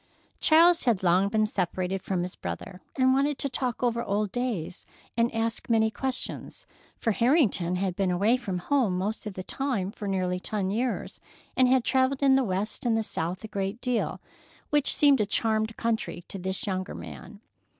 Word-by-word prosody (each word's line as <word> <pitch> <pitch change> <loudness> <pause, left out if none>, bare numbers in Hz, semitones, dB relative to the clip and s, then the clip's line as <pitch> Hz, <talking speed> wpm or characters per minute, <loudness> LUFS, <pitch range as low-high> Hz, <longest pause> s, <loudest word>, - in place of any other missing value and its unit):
Charles 335 +1 +5
had 225 -7 +2
long 185 +3 +3
been 215 0 +2
separated 185 -1 -2
from 180 -2 -1
his 180 - -6
brother, 135 - -6
and 260 -1 +4
wanted 280 +1 +1
to - - 0
talk 250 -2 -2
over 235 -1 +1
old 205 -2 -1
days 235 -10 -3 0.3
and 235 0 +2
ask 225 +1 -2
many 220 -1 +3
questions, 265 +3 -5 0.3
for 225 - 0
Harrington 230 - +2
had 185 -1 -1
been 195 -1 0
away 200 +7 +3
from 205 -8 -3
home 210 -1 +1
most 210 +4 -3
of 200 - -6
the 185 - -5
time 230 -6 -2
for 210 -1 -7
nearly 185 -2 0
ten 195 0 -2
years 240 +3 -2 0.4
and 255 - +5
had 255 -1 +4
travelled 265 +2 +1
in 270 -1 +6
the 265 0 +4
West 205 +4 -2
and 235 -3 +2
the 225 - 0
South 180 -1 -4
a - - -5
great 200 +1 -3
deal, 250 -2 -1 0.5
which 295 -1 +3
seemed 285 -5 +5
a - - +2
charmed 220 0 0
country 220 -6 -2
to 195 - -6
the 190 +1 -1
younger 185 -2 -3
man. 75 -7 -10
215 Hz, 185 wpm, -27 LUFS, 185-250 Hz, 0.5 s, in